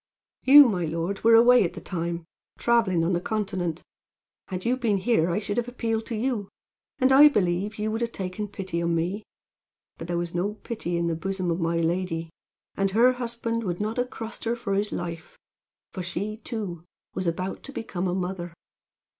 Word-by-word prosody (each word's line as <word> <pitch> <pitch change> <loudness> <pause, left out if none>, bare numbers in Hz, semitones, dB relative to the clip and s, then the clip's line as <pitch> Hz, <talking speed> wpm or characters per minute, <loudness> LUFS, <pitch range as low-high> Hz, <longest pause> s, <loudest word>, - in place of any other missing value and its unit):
"You, 285 +1 +9
my 185 -6 0
lord, 170 +5 -3
were 230 0 +7
away 240 +1 +7
at 170 - -2
the - - -7
time, 170 -2 -4 0.3
traveling 225 -8 +2
on 175 +3 +1
the 175 - 0
continent. 185 -6 -2 0.6
Had 185 -1 -5
you 245 +2 +3
been 230 -6 +1
here 185 -4 +2
I 170 - 0
should 205 0 -3
have 240 0 0
appealed 225 -2 -2
to 230 - -3
you, 220 -3 -1 0.5
and 260 +1 +3
I 280 +3 +9
believe 200 -4 +1
you 215 +1 -1
would 225 +2 -2
have 235 0 -1
taken 190 +1 -4
pity 190 -4 -4
on 170 0 +1
me, 180 +6 -1 0.8
but 165 - -6
there 175 0 -1
was 170 -1 -3
no 195 +4 -1
pity 205 -6 -4
in 170 - 0
the 170 - 0
bosom 185 +1 -2
of 165 - -1
my 170 0 0
lady; 165 -1 -1 0.4
and 195 0 +1
her 235 +6 +5
husband 235 -2 -3
would 175 -4 -3
not 215 +3 -2
have 245 0 0
crossed 225 0 -7
her 230 +1 +1
for 230 -4 -3
his 205 +2 0
life; 170 -2 -6 0.6
for 185 - -4
she, 190 +5 -4
too, 205 -8 -5 0.3
was 185 - -3
about 185 +3 -2
to 275 - -9
become 190 -8 -3
a 180 - -1
mother. 180 -2 -4
195 Hz, 195 wpm, -26 LUFS, 175-230 Hz, 0.8 s, You